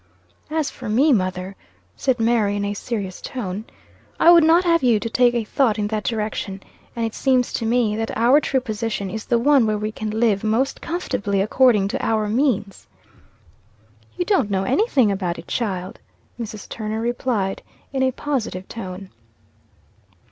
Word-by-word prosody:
"As 310 Hz, -2 st, -1 dB
for 245 Hz, -4 st, -8 dB
me, 270 Hz, +7 st, +4 dB
mother," 185 Hz, -2 st, -1 dB, 0.4 s
said 260 Hz, -3 st, 0 dB
Mary, 225 Hz, -3 st, +2 dB
in 205 Hz, 0 st, -1 dB
a 205 Hz, -, -2 dB
serious 200 Hz, -3 st, -5 dB
tone, 210 Hz, -4 st, -5 dB, 0.5 s
"I 340 Hz, -, +7 dB
would 340 Hz, -2 st, +7 dB
not 330 Hz, +3 st, +5 dB
have 335 Hz, -1 st, +3 dB
you 240 Hz, -4 st, +3 dB
to 230 Hz, -, -4 dB
take 245 Hz, -1 st, +3 dB
a 235 Hz, -, 0 dB
thought 225 Hz, 0 st, +1 dB
in 210 Hz, -, -1 dB
that 215 Hz, -1 st, -2 dB
direction. 210 Hz, -3 st, -3 dB, 0.3 s
And 230 Hz, -1 st, -1 dB
it 225 Hz, -, -4 dB
seems 255 Hz, -2 st, +1 dB
to 225 Hz, -, -2 dB
me 230 Hz, -2 st, +2 dB
that 225 Hz, 0 st, -3 dB
our 245 Hz, +6 st, +5 dB
true 265 Hz, -2 st, 0 dB
position 215 Hz, -4 st, -3 dB
is 220 Hz, +1 st, -5 dB
the 235 Hz, -, +2 dB
one 265 Hz, -1 st, +4 dB
where 215 Hz, -1 st, 0 dB
we 215 Hz, +1 st, -3 dB
can 215 Hz, 0 st, -5 dB
live 220 Hz, -2 st, +1 dB
most 230 Hz, +6 st, 0 dB
comfortably 205 Hz, -, -2 dB
according 215 Hz, 0 st, +3 dB
to -, -, -3 dB
our 215 Hz, -1 st, +1 dB
means." 210 Hz, -, -1 dB, 1.3 s
"You 355 Hz, -, -1 dB
don't 365 Hz, -, +2 dB
know 195 Hz, -1 st, 0 dB
anything 265 Hz, -, +2 dB
about 185 Hz, -3 st, -2 dB
it, 165 Hz, -, -10 dB
child," 195 Hz, -3 st, -3 dB, 0.4 s
Mrs. 215 Hz, -2 st, -6 dB
Turner 215 Hz, 0 st, -4 dB
replied, 230 Hz, -4 st, -1 dB, 0.3 s
in 265 Hz, -, 0 dB
a 260 Hz, -, +3 dB
positive 245 Hz, -10 st, -3 dB
tone. 190 Hz, -3 st, -7 dB
225 Hz, 170 wpm, -22 LUFS, 205-255 Hz, 1.3 s, I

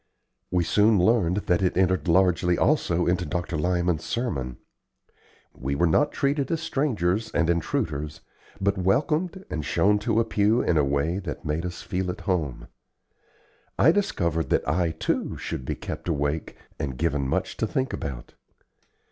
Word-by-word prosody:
We 90 Hz, -1 st, +1 dB
soon 105 Hz, +5 st, +4 dB
learned 95 Hz, -2 st, +3 dB
that 90 Hz, 0 st, +2 dB
it 90 Hz, -1 st, +1 dB
entered 95 Hz, 0 st, +2 dB
largely 90 Hz, 0 st, +3 dB
also 90 Hz, -, +2 dB
into 90 Hz, +1 st, +1 dB
Dr. 85 Hz, -1 st, -3 dB
Lyman's 85 Hz, 0 st, 0 dB
sermon. 80 Hz, -, -3 dB, 1.0 s
We 70 Hz, +2 st, -3 dB
were 85 Hz, +5 st, +2 dB
not 145 Hz, -, +3 dB
treated 140 Hz, 0 st, 0 dB
as 165 Hz, -2 st, 0 dB
strangers 110 Hz, -, 0 dB
and 85 Hz, 0 st, +3 dB
intruders, 80 Hz, -2 st, -2 dB, 0.4 s
but 100 Hz, 0 st, +1 dB
welcomed 155 Hz, -, 0 dB
and 75 Hz, -, -2 dB
shown 105 Hz, +8 st, +2 dB
to 110 Hz, +1 st, +1 dB
a 115 Hz, -, +2 dB
pew 110 Hz, +1 st, +2 dB
in 85 Hz, -, +1 dB
a 75 Hz, -, +4 dB
way 70 Hz, +6 st, 0 dB
that 90 Hz, -7 st, -6 dB
made 80 Hz, +4 st, -1 dB
us 90 Hz, -, -7 dB
feel 90 Hz, 0 st, -2 dB
at 95 Hz, +3 st, -5 dB
home. 85 Hz, -8 st, -2 dB, 1.1 s
I 155 Hz, -, +6 dB
discovered 85 Hz, -, 0 dB
that -, -, +1 dB
I, 85 Hz, +3 st, +1 dB
too, 80 Hz, 0 st, -2 dB
should 65 Hz, -, -5 dB
be -, -, -2 dB
kept -, -, -6 dB
awake 75 Hz, 0 st, -1 dB, 0.2 s
and 65 Hz, -3 st, -3 dB
given 75 Hz, -4 st, 0 dB
much -, -, -1 dB
to -, -, 0 dB
think 130 Hz, 0 st, -1 dB
about. 65 Hz, -3 st, -6 dB
90 Hz, 160 wpm, -25 LUFS, 80-105 Hz, 1.1 s, I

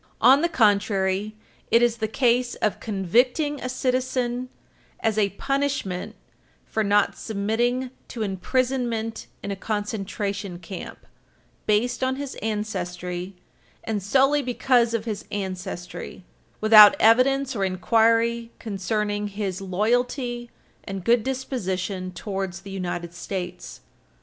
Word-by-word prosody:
On 265 Hz, +5 st, +6 dB
the 340 Hz, -, +2 dB
contrary, 205 Hz, -, +2 dB, 0.3 s
it 230 Hz, +1 st, +5 dB
is 235 Hz, -1 st, +2 dB
the 220 Hz, -1 st, -1 dB
case 245 Hz, +1 st, +1 dB
of 210 Hz, -, -1 dB
convicting 245 Hz, -, +1 dB
a 255 Hz, -, -3 dB
citizen 255 Hz, -1 st, -1 dB, 0.5 s
as 220 Hz, -2 st, +1 dB
a 210 Hz, -2 st, +2 dB
punishment 275 Hz, -6 st, -2 dB, 0.5 s
for 220 Hz, -, -1 dB
not 205 Hz, 0 st, +3 dB
submitting 235 Hz, +5 st, -1 dB, 0.2 s
to 230 Hz, -, -4 dB
imprisonment 230 Hz, +2 st, -1 dB, 0.2 s
in 200 Hz, -, -3 dB
a -, -, -2 dB
concentration 200 Hz, -2 st, -3 dB
camp, 180 Hz, +1 st, -9 dB, 0.6 s
based 240 Hz, +4 st, +1 dB
on 260 Hz, 0 st, +1 dB
his 280 Hz, -1 st, -5 dB
ancestry, 180 Hz, -4 st, -3 dB, 0.5 s
and 215 Hz, -2 st, -2 dB
solely 270 Hz, +8 st, +3 dB
because 245 Hz, -2 st, +2 dB
of 225 Hz, -1 st, -2 dB
his 215 Hz, -3 st, -4 dB
ancestry, 185 Hz, -2 st, -5 dB, 0.4 s
without 215 Hz, +3 st, +9 dB
evidence 265 Hz, +4 st, +4 dB
or 200 Hz, -, 0 dB
inquiry 230 Hz, +4 st, +2 dB
concerning 205 Hz, 0 st, -2 dB
his 200 Hz, -2 st, -4 dB
loyalty 240 Hz, +5 st, -1 dB, 0.3 s
and 195 Hz, -2 st, -6 dB
good 235 Hz, +2 st, +4 dB
disposition 190 Hz, -8 st, -3 dB
towards 190 Hz, -2 st, -4 dB
the 195 Hz, 0 st, -10 dB
United 175 Hz, -2 st, -4 dB
States. 180 Hz, 0 st, -6 dB
215 Hz, 115 wpm, -24 LUFS, 195-245 Hz, 0.6 s, without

